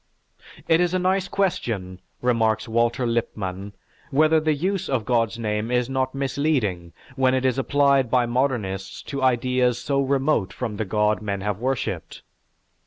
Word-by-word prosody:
"It 165 +1 +4
is 180 +1 +1
a - - +3
nice 185 +1 +1
question," 115 - -2 0.2
remarks 110 -3 +1
Walter 115 +2 +1
Lippmann, 100 -4 -3 0.4
"whether 155 +3 +4
the 155 -1 +1
use 185 +5 -2
of 125 -5 0
God's 115 -2 +1
name 105 -1 -2
is 125 +1 0
not 130 0 -1
misleading 135 - -1 0.2
when 130 -1 +3
it 130 0 0
is 130 0 +1
applied 140 -2 +3
by 125 -1 +3
modernists 120 -7 -2
to 140 -2 -5
ideas 125 -1 +2
so 140 +2 0
remote 135 -7 +1
from 115 -5 -4
the 110 - -2
God 105 +2 +1
men 100 -2 -3
have 105 0 -2
worshipped. 130 0 -3
125 Hz, 155 wpm, -23 LUFS, 110-140 Hz, 0.4 s, It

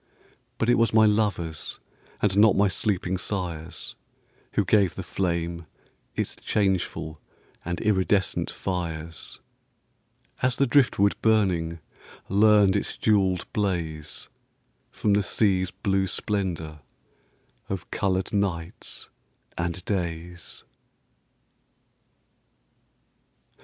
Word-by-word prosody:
But 115 - 0
it 120 - +4
was 115 -1 +2
my 110 -1 +7
lovers, 100 -7 0 0.4
And 100 -2 +3
not 105 0 +6
my 100 +1 +5
sleeping 95 -2 -1
sires, 90 -5 -4 0.6
Who 100 - +2
gave 100 -2 +3
the 95 - -5
flame 85 -3 -2 0.5
its - - -2
changeful 95 -6 -1 0.4
And 85 0 -3
iridescent 95 -2 +1
fires; 85 -3 -5 1.0
As 130 -1 +2
the 140 - +3
driftwood 120 -7 +4
burning 90 -7 +2 0.5
Learned 105 -1 +5
its 100 - -2
jewelled 95 -4 +2
blaze 85 -7 -2 0.6
From 105 - 0
the 100 - +4
sea's 95 -3 +2
blue 95 +1 0
splendor 90 -7 -2 0.9
Of 95 -3 -5
colored 95 -1 0
nights 90 -5 -3 0.4
and 85 +1 -3
days. 85 -3 -4
95 Hz, 95 wpm, -26 LUFS, 85-105 Hz, 1.0 s, my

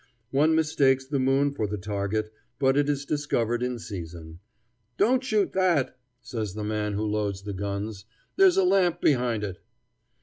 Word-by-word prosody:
One 155 +4 +3
mistakes 140 -4 +2
the 140 +1 -1
moon 135 +2 +2
for 110 -6 -2
the 105 +1 -3
target, 105 +2 -2 0.2
but 135 -1 +3
is 145 -1 +1
discovered 120 -6 -1
in 125 0 -1
season. 85 -6 -8 0.6
"Don't 255 +5 +3
shoot 215 -6 +1
that," 170 -10 +2 0.3
says 110 -5 -4
the 105 - -4
man 105 0 -2
who 105 +2 -1
loads 105 -2 -2
the 100 0 -5
guns; 100 +1 -4 0.3
"there's 385 -1 +5
a 190 - +5
lamp 180 -2 +3
behind 120 -6 +1
it." 95 -3 -5
120 Hz, 160 wpm, -26 LUFS, 105-145 Hz, 0.6 s, there's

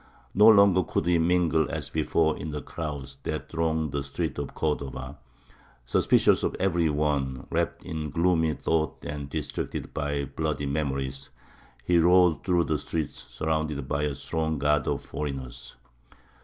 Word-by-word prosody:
No 105 +3 +6
longer 100 -4 +7
could 85 - -2
he 85 -1 +3
mingle 85 -2 +2
as - - -4
before 80 0 +1
in 80 - -6
the 75 -1 -4
crowds 75 -4 -6
that - - -4
thronged 80 -2 0
the 70 0 -1
streets 70 +1 -3
of 70 - -5
Cordova; 70 -2 -3 0.7
suspicious - - +3
of - - -1
every 85 -4 +1
one, 70 -3 -1
wrapped - - -1
in 80 -1 -4
gloomy 80 0 +2
thoughts 80 -3 -1
and 75 -1 -5
distracted - - -4
by 70 -1 -1
bloody 75 0 -2
memories, 70 -2 -2 0.6
he 85 +2 +4
rode 90 -1 +5
through 90 -2 +2
the 80 -2 -1
streets 80 0 -4
surrounded 80 -3 -2
by 70 +1 -1
a 75 -2 -1
strong 80 +3 -2
guard 75 0 +1
of - - -2
foreigners. 70 -5 -6
75 Hz, 150 wpm, -27 LUFS, 70-80 Hz, 0.7 s, longer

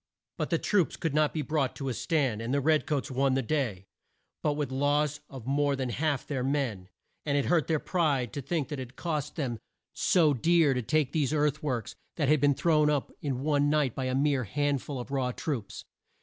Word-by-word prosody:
But - - -1
the - - +2
troops 200 -6 +1
could 165 -4 -2
not 150 0 +3
be 155 - -2
brought 140 -2 -1
to 135 - -5
a 130 - -1
stand, 135 -8 0
and 115 +2 -3
the 140 - +2
red 155 +2 +2
coats 145 -1 -1
won 135 +1 +2
the 135 - +1
day, 115 -9 -1 0.6
but 150 -1 +1
with 145 -1 -2
the - - -6
loss 145 +2 +1
of 130 -5 -9
more 140 +1 +1
than 130 -2 -2
half 145 +3 0
of - - -28
their 135 -4 -2
men. 125 -9 -1 0.3
And 145 -1 0
it 140 - +1
hurt 170 -3 +2
their 160 - +2
pride 145 - 0
to 140 - -3
think 155 +1 -2
that 145 -3 -4
it 130 -2 -6
had 130 - -22
cost 150 -3 -3
them 125 -8 -3 0.3
so 160 -5 +3
dear 160 +2 +3
to 125 - -1
take 150 +3 +1
these 150 -3 0
earth 150 0 +1
works 125 -8 -2 0.2
that 145 -5 0
had 150 -1 +4
been 145 -1 +4
thrown 155 -2 +3
up 145 -3 0
in 135 -3 -2
one 145 -1 +2
night 145 -5 +2
by 130 - -3
a 130 0 0
mere 140 -2 +2
hand 145 +4 0
ful 140 -3 -5
of 125 - -7
raw 130 -2 0
troops. 125 -5 -4
145 Hz, 235 wpm, -29 LUFS, 130-150 Hz, 0.6 s, had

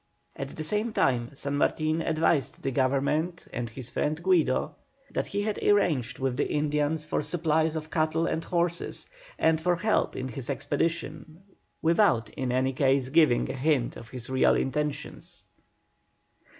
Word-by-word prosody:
At 135 0 -6
the 155 - -3
same 210 +7 -1
time 120 - +1
San 140 +1 -2
Martin 155 +2 +1
advised 160 -2 0
the 135 - 0
Government 140 +7 0
and 120 -1 -3
his 125 +2 -9
friend 155 +1 -1
Guido 160 -5 +2 0.4
that - - -2
he 205 0 -2
had 215 0 -2
arranged 155 - +2
with 130 -2 -1
the - - 0
Indians 150 +1 0
for - - -1
supplies 160 0 0
of 155 0 -5
cattle 160 +1 +1
and 165 - -1
horses, 170 -1 -2 0.3
and 160 0 +2
for 175 +1 +2
help 215 +6 +1
in 130 0 -4
his 125 +1 -6
expedition, 155 +4 -3 0.4
without 165 - +3
in 130 -2 -3
any 130 +1 +1
case 135 -1 +2
giving 150 -4 +4
a - - -5
hint 135 -2 +1
of 115 - -11
his 125 -2 -8
real 130 0 +3
intentions. 150 +2 -3
150 Hz, 155 wpm, -27 LUFS, 135-165 Hz, 0.4 s, giving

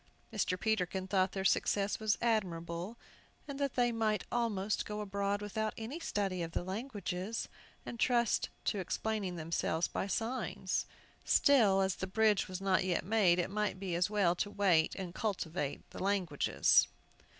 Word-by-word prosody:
Mr. 185 -4 0
Peterkin 190 -2 0
thought 190 -1 +1
their 190 -1 -3
success 200 +1 +2
was 215 0 +1
admirable, 180 -2 -1 0.5
and 280 -1 -6
that 280 -2 -1
they 245 -1 +3
might 215 -3 0
almost 215 -4 0
go 210 0 -5
abroad 200 0 -1
without 215 +1 -2
any 235 +9 -5
study 195 - -1
of 165 0 -4
the - - -1
languages, 200 0 -4 0.4
and 235 - -7
trust 240 -3 +2 0.2
to 205 - 0
explaining 195 0 -2
themselves 165 0 -1
by - - -3
signs. 230 +5 -2 0.4
Still, 215 -9 +5
as 190 -1 0
the 190 - -3
bridge 215 +1 +2
was 185 0 -5
not 190 -1 +2
yet 180 -2 0
made, 195 -4 +4
it 175 +1 -1
might 210 -2 -1
be 190 -3 -3
as 170 +2 +1
well 200 -5 +3
to 205 - -1
wait 195 -6 +2
and 185 -3 -5
cultivate 180 -9 -3
the - - -8
languages. 190 -6 +3
200 Hz, 160 wpm, -33 LUFS, 185-220 Hz, 0.5 s, Still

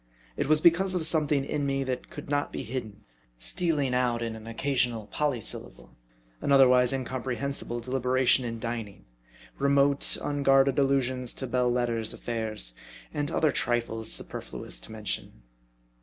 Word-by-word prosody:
It - - -1
was 155 0 +4
because 185 +3 +4
of 170 -3 0
something 150 -4 +2
in 145 - -2
me 135 0 0
that 130 -1 -4
could - - -9
not 145 0 0
be - - -4
hidden; 115 -4 -6 0.3
stealing 140 - 0
out 120 -2 +1
in 115 -1 -3
an 110 0 -10
occasional 120 -2 0
polysyllable; 140 -2 -2 0.5
an - - -1
otherwise 125 -2 +6
incomprehensible 130 -1 -3
deliberation 130 +1 +2
in 115 -1 -4
dining; 115 -4 -5 0.5
remote, 140 0 +3
unguarded 135 -1 +3
allusions 130 -2 +1
to 130 - -3
Belles 125 0 +1
Lettres 115 -3 0
affairs; 110 - -3 0.4
and 145 0 -1
other 160 -2 +2
trifles 115 -2 -1
superfluous - - -4
to 110 - -11
mention. 105 - -5
130 Hz, 140 wpm, -28 LUFS, 115-140 Hz, 0.5 s, otherwise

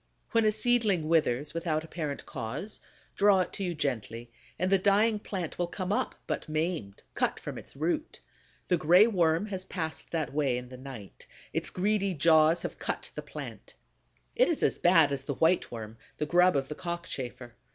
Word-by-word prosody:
When 230 -1 +3
a 215 - +5
seedling 215 -7 +2
withers 150 -3 +1
without 165 -2 -1
apparent 155 -3 -5
cause, 130 - -5 0.4
draw 200 -2 +5
it - - -3
to 200 - -4
you 175 -2 -2
gently; 120 -5 -3 0.3
and 185 +2 0
the 195 - +5
dying 210 +3 +3
plant 185 -6 -5
will 175 - +1
come 185 +2 -4
up, - - -1
but - - -3
maimed, 155 - -2
cut - - 0
from - - -6
its - - -14
root. 175 - -2 0.5
The 180 - +3
Gray 175 +6 +6
Worm 175 -4 +2
has 190 -3 -4
passed 160 -4 -5
that 155 -5 -2
way 140 -4 +1
in 125 0 -7
the 130 - -9
night; 130 -6 -10 0.3
its - - -1
greedy 195 0 0
jaws 160 +2 +5
have - - -5
cut - - -4
the - - -5
plant. - - -9 0.6
It - - +5
is 335 - 0
as - - +2
bad 165 -5 +5
as 135 -1 -3
the 140 - -3
White 165 +5 +2
Worm, 110 -1 -8 0.2
the 150 - -1
grub 180 +3 +4
of 135 -1 -1
the 150 - -4
Cockchafer. 140 -8 -5
165 Hz, 185 wpm, -29 LUFS, 140-190 Hz, 0.6 s, Gray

